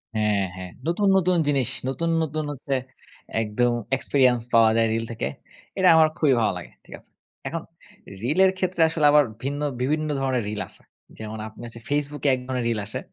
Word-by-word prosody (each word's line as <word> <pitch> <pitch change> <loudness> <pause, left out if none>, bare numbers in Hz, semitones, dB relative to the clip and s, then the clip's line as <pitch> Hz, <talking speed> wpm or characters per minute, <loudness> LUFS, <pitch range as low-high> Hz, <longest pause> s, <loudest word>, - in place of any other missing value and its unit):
হ্যাঁ, 105 -2 +1
হ্যাঁ 90 -1 -8 0.2
নতুন, 195 +4 +1
নতুন 180 -1 +2
জিনিস। 135 -5 +2 0.2
নতুন, 165 +6 -2
নতুন 155 0 -3
হচ্ছে 135 0 -3 0.7
একদম 120 +3 +1 0.3
এক্সপেরিয়েন্স 125 -4 +2
পাওয়া 115 -1 +6
যায় 115 0 +3
রিল 115 0 -1
থেকে। 115 - -3 0.5
এটা 185 -1 +4
আমার 160 -1 +6
খুবই 150 -5 +3
ভালো 100 - +2
লাগে। 90 - -9
ঠিক - - -13
আছে? - - -12 0.4
এখন - - -3 0.6
রিলের 185 +9 +4
ক্ষেত্রে 185 -2 -1
আসলে 160 -2 0
আবার 150 0 +6 0.2
ভিন্ন 145 +2 -3 0.2
বিভিন্ন 155 +4 0
ধরনের 130 -4 0
রিল 105 0 -4
আছে। - - -9 0.4
যেমন 110 0 -6
আপনি 110 - -13
হচ্ছে 115 0 -8
Facebook 145 -1 -2
এ - - +6
এক 130 - 0
ধরনের 125 -2 -2
রিল 110 -2 -1
আসে। 105 - -4
135 Hz, 185 wpm, -24 LUFS, 115-155 Hz, 0.7 s, পাওয়া